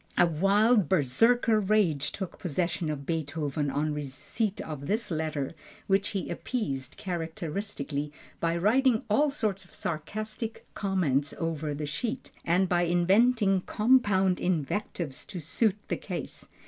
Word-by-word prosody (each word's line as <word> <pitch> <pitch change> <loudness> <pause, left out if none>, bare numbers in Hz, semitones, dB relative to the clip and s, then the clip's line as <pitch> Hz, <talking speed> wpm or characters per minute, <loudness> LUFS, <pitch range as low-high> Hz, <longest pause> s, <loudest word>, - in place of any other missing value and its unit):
A 175 - +7
wild 195 +4 +3
Berserker 215 - +4
rage 190 -8 +2
took 190 -3 -6
possession 170 -1 -1
of 140 -2 -4
Beethoven 150 -2 -2
on 150 +2 0
receipt 150 - -3
of 145 -3 -6
this 220 0 -1
letter 155 -3 -2 0.3
which 195 0 +2
he 195 -3 -3
appeased 135 - -3
characteristically 160 -3 -4 0.3
by 165 0 +1
writing 230 +5 +3
all 290 +8 +4
sorts 210 -9 -1
of 175 - -16
sarcastic 215 +7 -4
comments 155 -8 0
over 155 -2 -2
the 150 +1 -3
sheet, 225 - -3
and 180 +3 +3
by 175 -1 +2
inventing 195 +3 +3
compound 205 -6 +3
invectives 170 -3 -2
to 185 - -6
suit 185 +6 +1
the - - -1
case. - - -6
180 Hz, 130 wpm, -28 LUFS, 150-210 Hz, 0.3 s, A